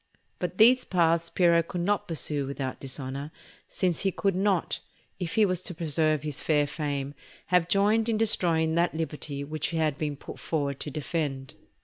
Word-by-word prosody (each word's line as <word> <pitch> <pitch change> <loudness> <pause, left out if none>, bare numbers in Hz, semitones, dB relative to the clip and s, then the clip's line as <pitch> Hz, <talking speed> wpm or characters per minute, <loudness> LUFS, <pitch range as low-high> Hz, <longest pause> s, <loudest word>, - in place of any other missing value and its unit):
But - - -3
these 250 +3 +6
paths 170 -2 +2
Piero 170 -2 +4
could 170 +1 -5
not 205 +4 0
pursue 150 -4 0
without 135 -1 -4
dishonour, 135 +1 -5 0.4
since 180 -4 0
he 195 - +1
could 195 +2 0
not, 190 -2 +1 0.4
if 175 -3 -3
he 220 - +5
was 185 -2 0
to 180 -1 -3
preserve 155 -2 +1
his 150 -2 -3
fair 150 -2 +2
fame, 145 -2 -3 0.4
have 180 -2 +4
joined 215 +4 +3
in 220 - +1
destroying 170 -7 +2
that 170 0 +1
liberty 150 -3 -4
which 155 +1 -3
he 165 - -3
had 155 -3 0
been 150 -2 -2
put - - -10
forward 140 -4 -2
to - - -5
defend. 145 -3 -3
160 Hz, 175 wpm, -27 LUFS, 145-180 Hz, 0.4 s, these